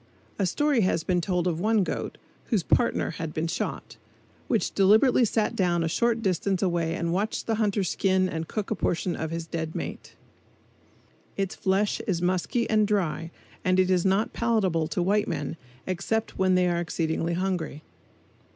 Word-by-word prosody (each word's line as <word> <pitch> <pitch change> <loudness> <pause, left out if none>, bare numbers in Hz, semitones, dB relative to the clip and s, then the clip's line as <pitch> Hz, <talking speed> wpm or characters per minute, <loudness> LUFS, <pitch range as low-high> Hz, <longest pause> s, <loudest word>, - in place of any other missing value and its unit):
A 195 - +2
story 290 - +2
has 185 -4 +1
been 180 0 +1
told 180 0 0
of 170 -3 0
one 215 +1 +3
goat, - - -4 0.3
whose 215 -8 0
"partner" 235 - +1
had 160 -1 -6
been 155 - 0
shot, 170 - -4 0.5
which - - 0
deliberately 220 +6 +5
sat 220 0 0
down 175 -3 +1
a - - 0
short 230 +6 +1
distance 190 0 0
away 170 -3 0
and 170 -1 -1
watched 205 +4 -1
the 225 - 0
hunter 205 -2 +1
skin 190 0 +1
and 165 -2 -4
cook 215 +3 -4
a - - +2
portion 175 -1 -1
of 160 - -3
his 165 0 -4
dead 160 -1 -4
mate. - - -6 1.2
Its 195 -1 -1
flesh 195 +2 0
is 185 -5 +1
musky 185 +7 0
and 215 -1 +3
dry 165 -6 -1 0.3
and 185 0 +2
it 185 0 +3
is 180 -2 +3
not 195 +3 +1
palatable 195 -9 +1
to 175 +2 -1
white 205 +3 +2
men - - -3 0.3
except 220 +5 -2
when 185 -1 +2
they 180 0 +3
are 170 -1 +1
exceedingly 165 0 -1
hungry. 180 -5 -2
185 Hz, 175 wpm, -26 LUFS, 170-205 Hz, 1.2 s, deliberately